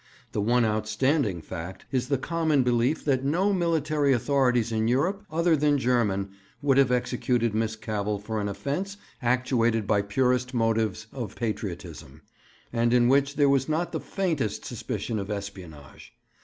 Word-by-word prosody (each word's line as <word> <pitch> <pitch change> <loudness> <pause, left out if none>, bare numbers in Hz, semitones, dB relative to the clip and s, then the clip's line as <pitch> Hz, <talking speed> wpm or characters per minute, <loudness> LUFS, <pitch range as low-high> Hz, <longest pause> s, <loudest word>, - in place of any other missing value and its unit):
The 105 - -1
one 120 +3 +3
outstanding 110 - 0
fact 90 +3 -7
is 130 -2 0
the 140 0 +1
common 160 -1 +1
belief 125 +4 +1
that 135 -3 +1
no 180 +9 +2
military 155 -5 +1
authorities 125 -2 +2
in 110 0 0
Europe, 175 - +1
other 165 0 +2
than 145 -1 +2
German, 110 -7 +1 0.3
would 140 -1 +3
have 135 -2 +4
executed 120 -2 0
Miss 110 0 -1
Cavell 105 -1 -2
for 105 +1 -4
an 100 - -2
offence 165 - -3 0.2
actuated 120 -3 +1
by 105 0 +2
purest 125 +4 0
motives 110 -2 0
of 120 -7 -5
patriotism, 85 - -5 0.5
and 120 0 +2
in 120 0 +4
which 140 +1 +3
there 145 -1 +4
was 135 0 +2
not 165 +3 0
the - - -2
faintest 160 - -2
suspicion 110 -2 -4
of 100 +1 -5
espionage. 95 -8 -8
125 Hz, 155 wpm, -26 LUFS, 110-140 Hz, 0.5 s, have